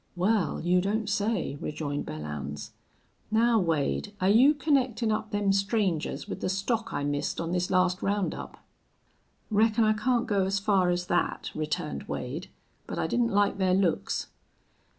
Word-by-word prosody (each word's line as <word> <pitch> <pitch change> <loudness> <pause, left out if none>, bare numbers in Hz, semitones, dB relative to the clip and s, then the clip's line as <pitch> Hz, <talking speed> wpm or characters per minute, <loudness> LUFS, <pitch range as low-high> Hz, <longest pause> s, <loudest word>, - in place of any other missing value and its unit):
"Wal, 185 -2 +1
you 180 +2 +3
don't 210 +3 -1
say!" 205 -7 -1
rejoined 150 -2 -4
Belllounds. 75 -2 -6 0.6
"Now, 225 +1 +3
Wade, 145 - -1
are 185 - +2
you 255 +8 +6
connectin' 260 -6 +1
up 215 0 -3
them 205 -1 +1
strangers 195 -5 0
with - - -6
the - - -1
stock 225 +4 -1
I - - -2
missed 145 0 -2
on 165 0 -2
this 180 0 0
last 185 0 +2
round 200 -1 0
up?" - - -9 0.9
"Reckon 220 +2 +3
I 215 0 +4
can't 240 +3 +1
go 200 -2 +1
as 195 +1 0
far 200 -3 +2
as 175 0 0
that," 175 - -1
returned 155 +1 -3
Wade. 155 +10 -5 0.4
"But - - -5
I - - 0
didn't 240 -1 +1
like 205 -1 +2
their 185 -1 +3
looks." 185 -4 0
195 Hz, 160 wpm, -28 LUFS, 170-215 Hz, 0.9 s, you